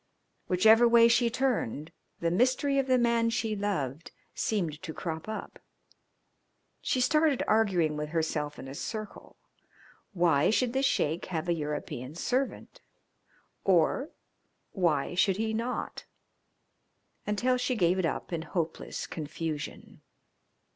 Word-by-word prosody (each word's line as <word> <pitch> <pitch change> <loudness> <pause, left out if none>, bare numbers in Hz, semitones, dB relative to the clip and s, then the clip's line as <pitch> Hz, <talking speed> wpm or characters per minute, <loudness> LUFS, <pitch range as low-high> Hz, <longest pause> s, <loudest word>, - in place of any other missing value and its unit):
Whichever 220 +6 +6
way 230 0 +7
she 235 0 +3
turned, 225 - -1 0.3
the 170 0 +1
mystery 260 +7 +2
of 270 - 0
the 255 -1 +4
man 235 -1 +2
she 225 -1 -1
loved 165 -8 -3 0.2
seemed 170 -8 -2
to 160 - -7
crop 160 +3 -5
up. 220 - -6 1.2
She 260 - 0
started 300 +2 +3
arguing 185 -8 +2
with 150 0 -3
herself 155 -2 -2
in - - -8
a 135 - -7
circle 215 +8 -7 0.8
why 170 -4 +3
should 235 +2 +1
the 265 - +1
Sheik 165 - 0
have 170 -1 -3
a 175 - +2
European 150 -3 -5
servant 255 +9 -2 0.8
or 190 - +2 0.6
why 170 -6 0
should 185 +1 +2
he 220 0 -1
not, 235 +3 -3 1.2
until 245 +5 +1
she 250 0 -1
gave 180 -3 +2
it 185 - +1
up 175 - -4
in 165 - -1
hopeless 165 -1 -4
confusion. 155 -1 -6
190 Hz, 125 wpm, -29 LUFS, 160-235 Hz, 1.2 s, way